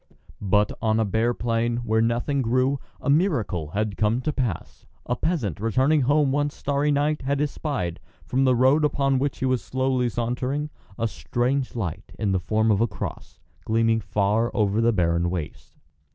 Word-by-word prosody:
But 105 +1 +2
on 110 -1 +2
a 110 - +2
bare 115 +4 +1
plain, 115 0 0
where 110 -2 +1
nothing 120 +5 0
grew, 130 +3 +1 0.2
a - - -7
miracle 140 - +1
had 105 +4 -2
come 110 +2 +2
to 150 +2 -2
pass: 120 - -4 0.2
a 125 - -1
peasant, 125 - -1
returning 130 +8 +2
home 145 +1 +3
one 145 +1 +1
starry 145 +1 -1
night, 150 +1 +1
had 140 +1 -1
espied, 140 - -2 0.3
from 130 +2 +1
the 130 -1 +4
road 130 +5 +4
upon 135 -2 +2
which 140 0 -1
he - - -2
was 130 -2 0
slowly 130 -1 0
sauntering, 125 +6 -2 0.3
a 115 -1 0
strange 125 +4 -2
light 100 -3 -5
in 105 -3 0
the 95 - +1
form 110 +4 +1
of 100 0 +2
a 115 - +3
cross, - - -7 0.2
gleaming 115 0 +2
far 105 +3 +1
over 105 -1 +2
the 115 +1 +4
barren 85 -3 +1
waste. 85 -4 -6
120 Hz, 175 wpm, -24 LUFS, 110-135 Hz, 0.3 s, the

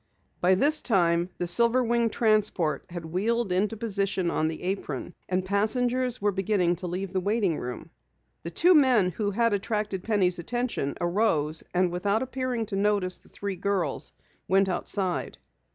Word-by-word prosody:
By 185 +1 +4
this 295 +9 +3
time 175 -5 +2
the 175 - -2
silver 235 +8 +3
winged 235 -1 +1
transport 205 - +1
had 170 -1 -7
wheeled 205 +6 -1
into 205 +5 0
position 200 -4 -1
on 155 - 0
the 160 +1 -5
apron, 180 -4 -4 0.2
and 185 0 0
passengers 245 +5 +1
were 205 0 +1
beginning 190 -3 0
to 180 +1 -4
leave 185 +2 -4
the 190 - +1
waiting 200 -3 0
room. 125 0 -7 0.5
The 170 - -5
two 340 - +4
men 250 - +4
who 205 +4 -2
had 230 +2 +1
attracted 205 -1 -2
Penny's 185 -4 +1
attention, 240 - -2
arose 175 -4 0
and 180 0 +1
without 200 +6 0
appearing 255 -3 -3
to 205 -2 -5
notice 200 -2 +1
the - - -22
three 200 -2 -5
girls, 185 -6 -2 0.4
went 195 +1 +3
outside. 185 0 -2
195 Hz, 160 wpm, -26 LUFS, 180-225 Hz, 0.5 s, By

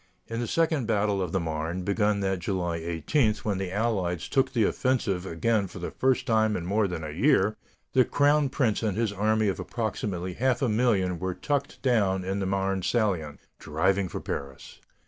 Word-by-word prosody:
In 115 0 -4
the 120 - -2
second 160 -6 +1
battle 105 -3 +1
of 90 -3 -2
the 95 - +1
Marne, 80 +2 -3
begun 105 +1 +1
that 95 -1 0
July 85 -2 -2
18, 85 - +1
when 100 -3 -1
the 95 -2 -3
Allies 95 -5 -1
took 135 -1 +1
the 115 - +2
offensive 100 -7 0
again 100 +4 0
for 95 - -11
the 90 - -5
first 130 -1 +1
time 110 -1 +2
in 85 - -5
more 100 +3 +1
than 85 -3 -5
a 75 - -5
year, 110 - +3 0.4
the 130 - +6
crown 145 +2 +3
prince 125 -6 0
and 105 -3 -1
his 110 -3 0
army 110 +2 +1
of 95 - -1
approximately 100 -6 -3
half 130 +6 +1
a 125 - +2
million 105 -6 +1
were 95 0 -2
tucked 140 -1 -2
down 100 -7 +2
in 95 +2 -2
the 95 - -1
Marne 95 0 0
salient, 90 -9 -1 0.2
driving 95 +5 +1
for - - -5
Paris. 70 -2 -6
100 Hz, 190 wpm, -27 LUFS, 90-115 Hz, 0.4 s, the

